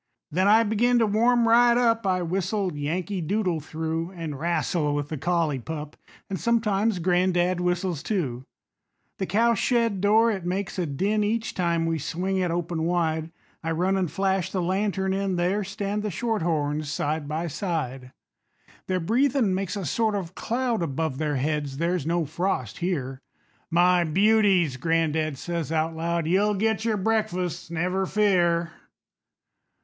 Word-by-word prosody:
Then 185 Hz, +5 st, +2 dB
I 220 Hz, +2 st, +6 dB
begin 230 Hz, +3 st, +2 dB
to 230 Hz, -, +4 dB
warm 230 Hz, +3 st, +3 dB
right 240 Hz, +1 st, +5 dB
up, 230 Hz, -3 st, +2 dB
I 185 Hz, -1 st, +1 dB
whistle 185 Hz, +1 st, -1 dB
"Yankee 175 Hz, +6 st, -2 dB
Doodle" 180 Hz, 0 st, 0 dB
through, 160 Hz, +2 st, -3 dB
An' 165 Hz, -4 st, -5 dB
wrastle 160 Hz, 0 st, 0 dB
with 145 Hz, 0 st, -3 dB
the 155 Hz, -, -4 dB
collie 165 Hz, -5 st, 0 dB
pup 150 Hz, +3 st, -6 dB, 0.3 s
And 190 Hz, -2 st, -4 dB
sometimes 220 Hz, -3 st, +1 dB
gran'dad 180 Hz, 0 st, +1 dB
whistles 180 Hz, -2 st, -1 dB
too. 135 Hz, -, -2 dB, 0.8 s
The 190 Hz, -, -1 dB
cow 230 Hz, +5 st, +3 dB
shed 230 Hz, -3 st, +1 dB
door, 220 Hz, +3 st, +4 dB
it 195 Hz, -4 st, -4 dB
makes 185 Hz, +2 st, -3 dB
a 175 Hz, -, 0 dB
din 200 Hz, +9 st, 0 dB
Each 220 Hz, +2 st, -1 dB
time 170 Hz, -2 st, 0 dB
we 165 Hz, -1 st, -1 dB
swing 185 Hz, +6 st, -2 dB
it 180 Hz, -2 st, 0 dB
open 170 Hz, -1 st, -2 dB
wide; 160 Hz, -1 st, 0 dB, 0.3 s
I 165 Hz, -, -2 dB
run 185 Hz, +4 st, +1 dB
an' 190 Hz, -2 st, +1 dB
flash 190 Hz, +2 st, -1 dB
the 190 Hz, -, -1 dB
lantern 190 Hz, +1 st, 0 dB
in, 195 Hz, -1 st, -1 dB
There 180 Hz, +4 st, 0 dB
stand 200 Hz, +1 st, -3 dB
the 210 Hz, -, -2 dB
shorthorns 160 Hz, -8 st, -1 dB
side 150 Hz, 0 st, -2 dB
by 155 Hz, +3 st, -2 dB
side. 145 Hz, -, -3 dB, 0.8 s
Their 185 Hz, -1 st, 0 dB
breathin' 235 Hz, -, +2 dB
makes 190 Hz, +1 st, -2 dB
a 200 Hz, -3 st, -4 dB
sort 220 Hz, -, 0 dB
of 185 Hz, -3 st, -4 dB
cloud 240 Hz, -1 st, -1 dB
Above 160 Hz, -2 st, -2 dB
their 150 Hz, -2 st, 0 dB
heads 145 Hz, 0 st, -2 dB
there's 170 Hz, -1 st, -1 dB
no 170 Hz, -1 st, +1 dB
frost 155 Hz, -, -2 dB
here. 140 Hz, -7 st, -2 dB, 0.5 s
"My 175 Hz, +1 st, +4 dB
beauties," 190 Hz, -4 st, +3 dB
gran'dad 160 Hz, 0 st, 0 dB
says 170 Hz, -1 st, -4 dB
out 160 Hz, 0 st, 0 dB
loud, 170 Hz, 0 st, -1 dB
"You'll 200 Hz, +5 st, +2 dB
get 220 Hz, +2 st, 0 dB
your 220 Hz, -2 st, +1 dB
breakfasts, 185 Hz, -6 st, -1 dB
never 180 Hz, +3 st, -1 dB
fear." 175 Hz, -5 st, +2 dB
180 Hz, 155 wpm, -25 LUFS, 160-205 Hz, 0.8 s, I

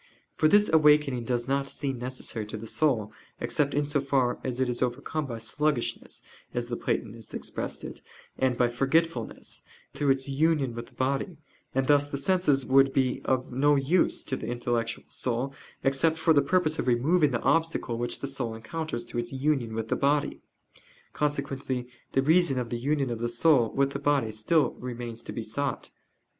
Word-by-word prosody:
For 155 Hz, -, +3 dB
this 205 Hz, +5 st, +5 dB
awakening 150 Hz, -5 st, +4 dB
does 120 Hz, 0 st, -1 dB
not 140 Hz, 0 st, 0 dB
seem 135 Hz, -3 st, -3 dB
necessary 125 Hz, -3 st, -4 dB
to 110 Hz, -, -6 dB
the 110 Hz, -, -8 dB
soul, 115 Hz, -5 st, 0 dB, 0.3 s
except 145 Hz, -2 st, 0 dB
in 145 Hz, -, +2 dB
as 145 Hz, 0 st, -5 dB
far 135 Hz, -3 st, +1 dB
as 130 Hz, -1 st, -3 dB
it 130 Hz, -, +2 dB
is 120 Hz, -1 st, -3 dB
overcome 140 Hz, +4 st, -2 dB
by 115 Hz, -3 st, -5 dB
sluggishness, 130 Hz, +3 st, -2 dB, 0.3 s
as 120 Hz, 0 st, -2 dB
the 120 Hz, -, -1 dB
Platonists 115 Hz, -1 st, -3 dB
expressed -, -, -4 dB
it, -, -, -8 dB, 0.3 s
and 130 Hz, -2 st, +1 dB
by 125 Hz, -, +4 dB
forgetfulness, 135 Hz, +1 st, -1 dB, 0.3 s
through 145 Hz, -, 0 dB
its 135 Hz, 0 st, +2 dB
union 140 Hz, -2 st, +1 dB
with 115 Hz, 0 st, -6 dB
the -, -, -21 dB
body: 140 Hz, +6 st, -1 dB, 0.4 s
and 135 Hz, 0 st, +2 dB
thus 145 Hz, +1 st, +3 dB
the 140 Hz, -, -3 dB
senses 145 Hz, -3 st, +2 dB
would 135 Hz, 0 st, +4 dB
be 130 Hz, -2 st, +1 dB
of 130 Hz, -1 st, 0 dB
no 145 Hz, +4 st, +3 dB
use 145 Hz, +6 st, +2 dB
to 135 Hz, -, -2 dB
the 110 Hz, -, -6 dB
intellectual 120 Hz, -1 st, -2 dB
soul 125 Hz, +2 st, -2 dB, 0.3 s
except 145 Hz, +4 st, +3 dB
for 160 Hz, 0 st, +4 dB
the 145 Hz, -, +5 dB
purpose 160 Hz, +1 st, +1 dB
of -, -, -1 dB
removing 145 Hz, +7 st, +3 dB
the 120 Hz, -3 st, -1 dB
obstacle 165 Hz, -7 st, +1 dB
which 120 Hz, -, -3 dB
the 140 Hz, -, -2 dB
soul 125 Hz, -4 st, -3 dB
encounters 120 Hz, +2 st, -4 dB
through 120 Hz, 0 st, -4 dB
its 120 Hz, -, -8 dB
union 135 Hz, -4 st, 0 dB
with 110 Hz, 0 st, -3 dB
the -, -, +2 dB
body. 145 Hz, +1 st, +1 dB, 0.7 s
Consequently 135 Hz, -4 st, -2 dB, 0.3 s
the 135 Hz, -, +3 dB
reason 160 Hz, -2 st, +4 dB
of 120 Hz, -2 st, -3 dB
the 120 Hz, -, -2 dB
union 140 Hz, 0 st, 0 dB
of 115 Hz, -, -3 dB
the 120 Hz, 0 st, -1 dB
soul 120 Hz, -1 st, +3 dB
with 140 Hz, 0 st, +2 dB
the 140 Hz, -, -4 dB
body 140 Hz, -6 st, +1 dB
still 125 Hz, +9 st, +2 dB
remains 120 Hz, -2 st, -6 dB
to -, -, -7 dB
be 115 Hz, -, -4 dB
sought. 140 Hz, +6 st, -3 dB
135 Hz, 185 wpm, -28 LUFS, 120-145 Hz, 0.7 s, this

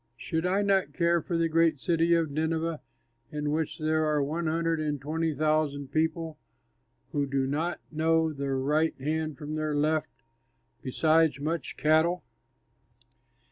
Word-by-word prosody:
Should 160 Hz, +6 st, -2 dB
I 195 Hz, +3 st, +2 dB
not 195 Hz, -1 st, +2 dB
care 170 Hz, -1 st, +2 dB
for 170 Hz, +2 st, -2 dB
the 165 Hz, 0 st, +2 dB
great 165 Hz, -1 st, +3 dB
city 165 Hz, +4 st, +1 dB
Nineveh, 160 Hz, +1 st, -1 dB, 0.5 s
in 150 Hz, -1 st, -2 dB
which 155 Hz, 0 st, -1 dB
there 155 Hz, 0 st, +1 dB
are 150 Hz, -2 st, +1 dB
one 160 Hz, +4 st, -2 dB
hundred 165 Hz, 0 st, 0 dB
and 150 Hz, -2 st, -1 dB
twenty 160 Hz, +4 st, -1 dB
thousand 150 Hz, -2 st, 0 dB
people 160 Hz, 0 st, -1 dB, 0.7 s
who 145 Hz, -1 st, 0 dB
do 135 Hz, 0 st, 0 dB
not 155 Hz, +6 st, -1 dB
know 160 Hz, 0 st, +2 dB
their 140 Hz, -1 st, -2 dB
right 150 Hz, +3 st, +1 dB
hand 155 Hz, +2 st, -2 dB
from 150 Hz, -1 st, -6 dB
their 155 Hz, -1 st, -1 dB
left; 155 Hz, +1 st, +1 dB, 0.7 s
besides 155 Hz, +3 st, +2 dB
much 155 Hz, 0 st, -3 dB
cattle?" 160 Hz, +2 st, +3 dB
155 Hz, 140 wpm, -28 LUFS, 150-165 Hz, 0.7 s, great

